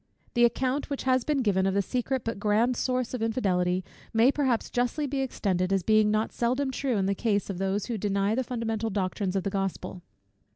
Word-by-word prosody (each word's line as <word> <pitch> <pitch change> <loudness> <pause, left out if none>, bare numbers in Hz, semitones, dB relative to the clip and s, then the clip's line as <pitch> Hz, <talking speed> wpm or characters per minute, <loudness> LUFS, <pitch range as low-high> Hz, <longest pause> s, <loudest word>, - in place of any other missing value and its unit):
The 240 -1 +5
account 260 +4 0
which 280 - -3
has 255 -1 +2
been 285 -2 0
given, 190 -3 +2
of 190 - 0
the 200 - +2
secret, 255 +3 -2
but 230 -3 -3
grand, 220 +4 +2
source 255 0 -1
of 250 - -3
infidelity, 185 -6 +1 0.3
may 230 +3 +5
perhaps 265 -6 0
justly 245 +5 0
be 275 0 -2
extended, 195 -8 -1
as 195 -2 +1
being 215 +2 +4
not 215 +1 0
seldom 255 +3 0
true 260 -3 -1
in 195 - +1
the 200 - +1
case 205 -1 0
of 185 - -6
those 195 +1 -1
who 235 -3 -3
deny 200 +1 +1
the 260 +3 0
fundamental 225 -3 -2
doctrines 195 -1 -2
of 190 - 0
the 200 - -2
Gospel. 195 -2 -3
225 Hz, 210 wpm, -27 LUFS, 195-255 Hz, 0.3 s, The